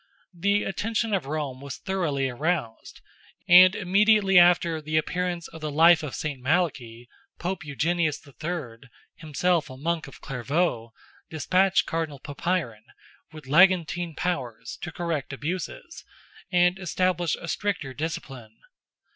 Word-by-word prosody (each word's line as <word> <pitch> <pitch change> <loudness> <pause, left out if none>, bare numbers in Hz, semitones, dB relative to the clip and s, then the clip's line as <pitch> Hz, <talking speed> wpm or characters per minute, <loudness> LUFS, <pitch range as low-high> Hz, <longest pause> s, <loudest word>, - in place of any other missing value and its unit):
The 200 +4 +1
attention 220 +2 -2
of 180 -9 -1
Rome 140 -3 -4
was 140 -1 -7
thoroughly 155 -8 -1
aroused, 130 -2 -3 0.5
and 185 +2 +8
immediately 200 0 +4
after 170 -2 +4
the 155 +1 -1
appearance 175 +1 -2
of 160 -1 -12
the 155 - -3
Life 165 +3 +5
of 150 -4 -5
Saint 145 -4 -4
Malachy, 130 -6 -1 0.3
Pope 185 0 -4
Eugenius 155 +2 -1
III.—himself 150 +3 -4
a 130 - -10
monk 165 +2 -2
of 140 - -13
Clairvaulx—despatched 155 +6 -1
Cardinal 160 -3 -3
Papiron, 145 -6 -3 0.5
with 155 -3 -12
legantine 175 +1 +3
powers, 130 -11 -3
to 160 - -5
correct 160 -5 -3
abuses, 180 - -5 0.5
and 180 +1 +3
establish 180 -2 0
a 170 - -9
stricter 175 -9 -2
discipline. 130 -7 -6
165 Hz, 120 wpm, -25 LUFS, 140-180 Hz, 0.5 s, and